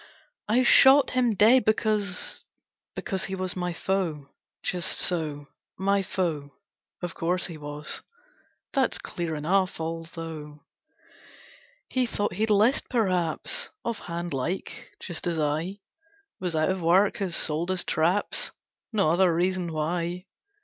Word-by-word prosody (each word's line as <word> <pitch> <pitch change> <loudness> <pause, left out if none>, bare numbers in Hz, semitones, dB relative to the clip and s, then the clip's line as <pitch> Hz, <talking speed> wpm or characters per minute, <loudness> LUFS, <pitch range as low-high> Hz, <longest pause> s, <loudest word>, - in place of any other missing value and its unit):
'I 245 +4 +4
shot 270 +3 +7
him 245 -4 +2
dead 230 +6 +6
because 215 -3 0 0.5
Because 190 -2 -2
he 190 - -4
was 185 -1 -3
my 180 -1 -2
foe, 165 -5 -2 0.3
Just 180 0 0
so: 150 -5 -1 0.3
my 200 +1 +2
foe 170 -6 -2 0.5
of 175 - -3
course 180 +2 0
he 170 - -5
was; 150 0 -6 0.7
That's 270 -4 +2
clear 170 -2 -4
enough; 180 +5 +1
although 160 -2 -6 1.2
'He 255 -1 0
thought 205 -4 -1
he'd 215 +4 0
'list, 215 +6 +3
perhaps, 195 - 0 0.2
Off 235 -1 -2
hand 170 -1 -5
like 140 +8 -3
just 175 0 -5
as 170 -2 0
I 160 +6 -1 0.6
Was 180 -3 -2
out 155 +2 +2
of 190 -1 -3
work 185 +7 +4
had 190 -5 -2
sold 160 +3 0
his 185 -1 +1
traps 175 +6 +1 0.4
No 195 -8 +2
other 180 +1 +4
reason 180 +1 0
why. 170 +3 -2
180 Hz, 130 wpm, -27 LUFS, 165-200 Hz, 1.2 s, shot